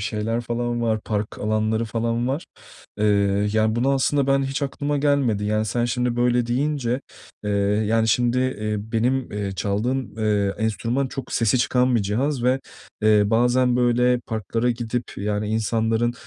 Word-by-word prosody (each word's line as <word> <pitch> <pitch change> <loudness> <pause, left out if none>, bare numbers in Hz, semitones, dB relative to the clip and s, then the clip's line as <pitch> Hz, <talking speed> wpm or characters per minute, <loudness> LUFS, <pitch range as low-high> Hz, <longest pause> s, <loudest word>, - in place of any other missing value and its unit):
şeyler 110 +2 -2
falan 120 0 -2
var, 110 -2 0
park 105 -1 -3
alanları 110 +1 0
falan 115 +2 -1
var. 140 +5 -3 0.5
Eee, 100 -1 +2
yani 110 0 +2
bunu 130 +4 +2
aslında 140 +1 +1
ben 135 0 +3
hiç 135 +2 -3
aklıma 145 +1 -2
gelmedi. 140 -7 +1
Yani, 110 +1 0
sen 120 +3 0
şimdi 125 0 -1
böyle 120 0 +2
deyince, 130 0 -1 0.4
eee, 105 - -2 0.4
yani 115 0 +2
şimdi, 120 +2 +2
eee, 110 -5 -1
benim, 120 +5 -1
eee, 100 -1 -3
çaldığım, 110 +6 -2
eee, 105 -2 +1
enstrüman 115 +5 -1
çok 135 0 -7
sesi 115 +1 +2
çıkan 125 0 +2
bir 115 - +2
cihaz 120 +7 -1
ve, 130 +2 +2 0.4
eee, 105 -1 +5
bazen, 120 +3 +2
böyle, 125 0 +3
parklara 115 +1 -2
gidip 120 +1 -3
yani 105 +1 -2
insanların, 110 +1 0
115 Hz, 155 wpm, -23 LUFS, 110-125 Hz, 0.5 s, eee